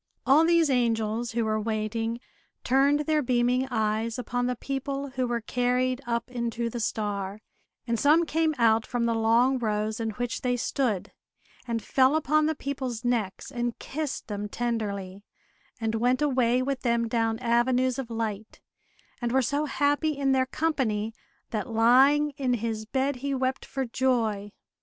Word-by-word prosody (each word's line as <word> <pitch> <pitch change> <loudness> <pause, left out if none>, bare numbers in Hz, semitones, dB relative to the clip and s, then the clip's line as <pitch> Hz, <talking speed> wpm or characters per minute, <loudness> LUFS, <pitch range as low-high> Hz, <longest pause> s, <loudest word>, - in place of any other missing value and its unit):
All 285 +4 +6
these 335 -3 +4
angels, 230 -1 0
who 230 -1 0
were 215 0 0
waiting, 225 +1 -2 0.4
turned 280 +3 +3
their 305 0 +1
beaming 250 0 +1
eyes 220 -1 -1
upon 245 0 -2
the 250 - -1
people 275 +2 -4
who 255 -1 -1
were 240 -1 -1
carried 250 +2 0
up 235 +1 -2
into 235 -1 -2
the 240 - -4
star; 205 -2 -2 0.5
and 230 -2 -1
some 315 +4 +4
came 320 0 +1
out 225 -2 +4
from 240 0 -2
the 230 - +1
long 230 +4 +3
rows 215 -1 -1
in 225 -1 -1
which 245 0 -3
they 245 -1 0
stood, 235 -5 -1 0.6
and 230 -1 -2
fell 265 +2 +3
upon 310 0 +2
the 315 - 0
people's 260 -4 -4
necks, 230 -1 -1
and 240 -2 -2
kissed 300 -1 -4
them 205 -1 -4
tenderly, 205 -5 -3 0.6
and 225 -1 -1
went 245 +3 +2
away 255 -3 +2
with 275 0 -2
them 235 -1 +1
down 225 -1 0
avenues 250 +2 +1
of 255 -3 -5
light, 220 -2 -4 0.6
and 240 -1 -1
were 265 +1 +3
so 285 +5 0
happy 290 +1 +1
in 275 -1 +1
their 260 -1 +2
company, 235 -9 -1 0.4
that 220 +3 -3
lying 265 +6 +5
in 255 -3 +1
his 220 -1 -3
bed 265 +2 0
he 275 +2 -2
wept 260 0 -1
for 270 -1 -3
joy. 230 -5 0
245 Hz, 160 wpm, -27 LUFS, 225-265 Hz, 0.6 s, All